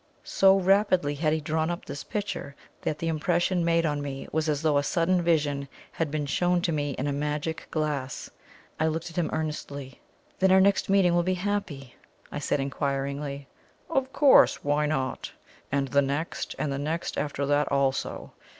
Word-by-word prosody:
So 195 0 +4
rapidly 190 -5 +3
had 155 +1 0
he 160 - +1
drawn 160 +2 -1
up 175 0 -4
this 145 - -6
picture, 200 -9 -4 0.3
that 150 - -2
the 165 - -3
impression 175 +2 +1
made 165 0 +2
on 145 -2 -1
me 135 -1 -5
was 160 0 0
as 150 0 -1
though 150 -2 +3
a - - -1
sudden 175 +4 +1
vision 145 -5 +1 0.2
had 165 -2 -2
been 150 0 -2
shown 175 +5 +1
to 170 - +1
me 145 -2 -1
in 130 - -3
a 145 - 0
magic 150 +2 -3
glass. 145 -4 -2 0.5
I 160 - +2
looked 160 +2 -3
at - - -15
him 175 -3 0
earnestly. 145 -4 -5 0.4
"Then 190 0 +4
our 190 - +7
next 200 +1 +3
meeting 195 -3 +4
will 175 - +3
be 185 +2 0
happy?" 180 -9 -3 0.3
I - - -4
said 145 - 0
inquiringly. 140 0 -3 0.4
"Of 270 -3 0
course. 285 -1 +5
Why 145 +1 +1
not? 135 -4 -2 0.4
And 135 -1 0
the 140 +1 +4
next 140 +4 -3
and 140 +1 -1
the 140 - -3
next 160 +4 -3
after 145 -1 -2
that 145 0 +1
also!" 135 -1 -1
155 Hz, 185 wpm, -27 LUFS, 140-175 Hz, 0.5 s, our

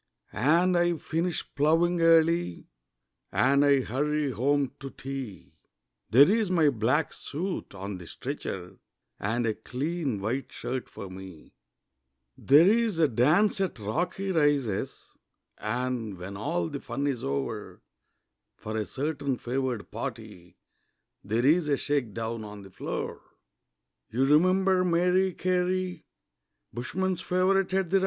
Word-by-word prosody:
And 170 +6 +3
I 175 -1 +2
finish 165 +2 -2
ploughing 165 +4 +2
early, 165 - +3 0.7
And 140 +2 +3
I 140 -2 +4
hurry 145 +3 -1
home 140 +3 +1
to 135 - -6
tea 135 -7 -7 0.6
There's 190 - +5
my 165 -5 +4
black 115 0 +1
suit 175 - -5
on 95 0 -6
the 85 - -10
stretcher, 95 - -6 0.4
And 115 +4 -1
a 110 - +1
clean 135 - -3
white 115 +7 -3
shirt 130 0 -5
for 100 - -8
me; 95 -4 -11 0.8
There's 195 - +4
a 160 -2 +4
dance 155 - +3
at 190 -8 -1
Rocky 175 - -2
Rises, 145 - 0 0.5
And, 115 -2 -2
when 95 +3 -7
all 90 -4 -1
the - - -5
fun 140 - -4
is 135 -5 -1
o'er, 70 0 -4 0.7
For 110 +1 -6
a 110 -1 -1
certain 140 - -2
favoured 125 -2 -3
party 90 0 -7 0.7
There's 135 - +2
a 145 -2 +2
shake 135 -8 -1
down 115 0 -3
on 105 -1 -9
the 95 - -13
floor. - - -5 0.9
You 125 +4 +1
remember 185 +5 +4
Mary 180 +2 +2
Carey, 180 -1 -1 0.7
Bushmen's 185 +9 -2
favourite 185 +1 +2
at 190 -3 0
the 195 - +5
Rise? - - +3
140 Hz, 125 wpm, -28 LUFS, 115-175 Hz, 0.9 s, There's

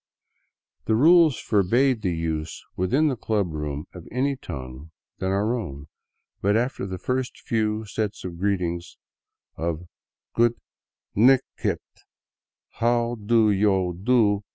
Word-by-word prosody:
The 110 - +2
rules 160 -1 +6
forbade 115 +5 +2
the 95 -4 0
use 80 -1 -3
within 130 +13 +2
the 135 - 0
club 105 -7 -1
room 75 -1 -4
of 90 -2 -11
any 135 +3 0
tongue 70 - -8 0.3
than 95 - -1
our 100 +4 +1
own, 70 - -6 0.5
but 100 +2 +3
after 120 -4 -1
the 95 -1 -4
first 125 +6 -2
few 110 -1 -1
set 105 0 -2 0.2
greetings 90 -3 -1 0.6
of 85 0 -2 0.3
" - - -69
goot 120 0 +3 0.6
nig 130 +5 +6 0.2
ht, - - +1 1.0
how 120 0 +2
do 110 0 +4
yo 95 -3 +2
do? 105 +1 +2
105 Hz, 130 wpm, -25 LUFS, 90-120 Hz, 1.0 s, rules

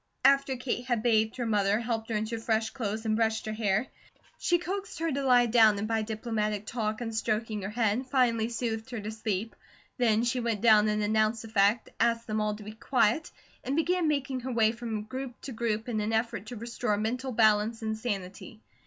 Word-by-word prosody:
After 275 0 +4
Kate 245 0 -3
had 240 -4 0
bathed 220 -2 +2
her 245 - -2
mother, 205 -1 +2
helped 225 -1 -3
her 225 - -1
into 220 +2 -2
fresh 225 0 0
clothes, 220 -3 -4
and 215 -1 +1
brushed 220 -1 0
her 215 - -3
hair, 215 +1 +1 0.5
she 350 - +2
coaxed 380 +3 -5
her 330 0 -1
to 280 0 -1
lie 250 -2 +5
down, 220 -3 +5
and 205 +2 -2
by 225 0 0
diplomatic 215 -1 -2
talk 220 -1 -2
and 225 -1 -4
stroking 215 -1 -1
her 195 - -4
head, 225 +3 0
finally 235 -4 +2
soothed 230 -1 -3
her 240 -3 -4
to 210 +1 -5
sleep. 220 -1 -3 0.4
Then 225 -2 +3
she 245 +1 0
went 230 -4 -1
down 215 -2 +6
and 210 0 0
announced 215 +1 +1
the 225 - -9
fact, 210 +2 +2
asked 230 0 +2
them 215 0 -1
all 210 0 0
to 210 - -10
be 210 - -7
quiet, 235 +5 +1 0.3
and 265 +3 -2
began 345 +1 +1
making 275 -3 -1
her 255 +1 -5
way 225 -2 +3
from 225 -2 -4
group 255 +3 -6
to 270 - -7
group 225 -1 -2
in 220 -3 -1
an 215 +2 -1
effort 220 -2 -1
to 245 - -6
restore 230 -1 -2
mental 250 +5 -2
balance 220 0 +3
and 220 0 -1
sanity. 205 -2 -5
225 Hz, 210 wpm, -29 LUFS, 215-245 Hz, 0.5 s, down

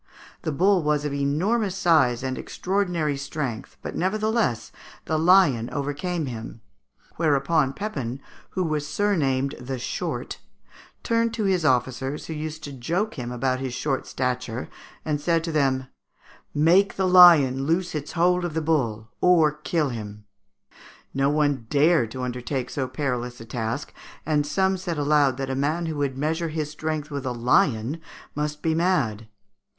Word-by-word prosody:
The 155 - -2
bull 185 +5 +3
was 150 -1 0
of 145 - -2
enormous 180 +9 0
size 135 -9 +3
and 130 -1 -2
extraordinary 180 -6 -1
strength, 135 -4 -5
but - - -5
nevertheless 210 - 0 0.3
the 155 -1 0
lion 160 -9 +4
overcame 150 +4 -2
him; 115 -2 -7 0.6
whereupon 145 -2 +2
Pepin, 135 - -4 0.3
who 185 - -2
was 155 -3 -1
surnamed 145 -7 +1
the 130 +1 -5
Short, 120 - -4 0.6
turned 230 0 +1
to 220 - -2
his 190 -4 +1
officers, 130 0 0
who 160 - -5
used 155 0 -5
to 145 - -6
joke 170 - -2
him 120 -4 -5
about 130 +1 -1
his 130 -2 -4
short 135 0 -2
stature, 125 -2 -3 0.4
and 150 -2 -1
said 165 +1 +1
to 165 - -3
them, 135 -4 +1 0.7
"Make 175 +7 +3
the 190 -1 +1
lion 160 -8 +7
loose 175 +4 0
his 150 -1 -5
hold 180 +1 +2
of 170 -3 -3
the - - +2
bull, 120 -9 -1
or 165 -4 +5
kill 150 0 -1
him." 105 -3 -7 0.9
No 135 +1 +2
one 145 -5 +1
dared 150 -4 +3
to 130 +3 -6
undertake 125 +1 -3
so 135 -2 -2
perilous 125 -2 -3
a 115 - -9
task, 115 +4 -4 0.3
and 150 -2 +1
some 190 +5 +1
said 180 -3 -4
aloud 145 -3 +3
that 135 -1 -3
the 130 - -1
man 150 +5 0
who 160 -2 -3
would 140 -2 -1
measure 160 +4 -1
his 155 -1 -3
strength 155 -1 -4
with 140 -2 -4
a 130 - -2
lion 125 - +1 0.3
must 150 0 -3
be 160 - +2
mad. 135 - 0
150 Hz, 155 wpm, -24 LUFS, 130-170 Hz, 0.9 s, lion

